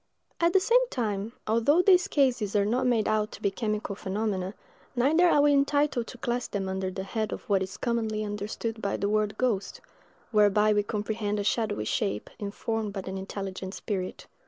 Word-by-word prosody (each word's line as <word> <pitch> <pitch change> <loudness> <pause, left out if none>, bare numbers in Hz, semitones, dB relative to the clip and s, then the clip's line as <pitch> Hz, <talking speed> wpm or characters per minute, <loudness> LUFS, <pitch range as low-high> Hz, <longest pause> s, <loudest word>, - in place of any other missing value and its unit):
At 340 0 +3
the 385 - +6
same 485 +5 +3
time, 215 -2 -2
although 230 +10 +3
these 365 -2 +5
cases 245 -8 +1
are 200 -1 +3
not 250 +4 +1
made 230 -3 +2
out 215 0 +1
to - - -10
be 200 - +2
chemical 215 -1 -2
phenomena, 195 0 -2 0.4
neither 315 +8 +4
are 290 -3 +4
we 290 0 +5
entitled 280 -3 +2
to 255 - -9
class 240 +1 -2
them 195 -2 -3
under 190 0 -2
the 190 +1 -5
head 215 +2 -2
of - - -6
what 195 -2 +2
is 190 +1 -4
commonly 220 -3 -1
understood 210 +2 -4
by 200 - -1
the 200 - -1
word 210 0 0
ghost; 210 -6 -1 0.5
whereby 210 0 +4
we 210 - +3
comprehend 210 0 -2
a - - -1
shadowy 205 - 0
shape, 105 0 -2
informed 210 +1 -3
by 195 - -3
an 190 0 -4
intelligent 190 0 -5
spirit. 190 -4 -4
215 Hz, 185 wpm, -28 LUFS, 200-240 Hz, 0.5 s, the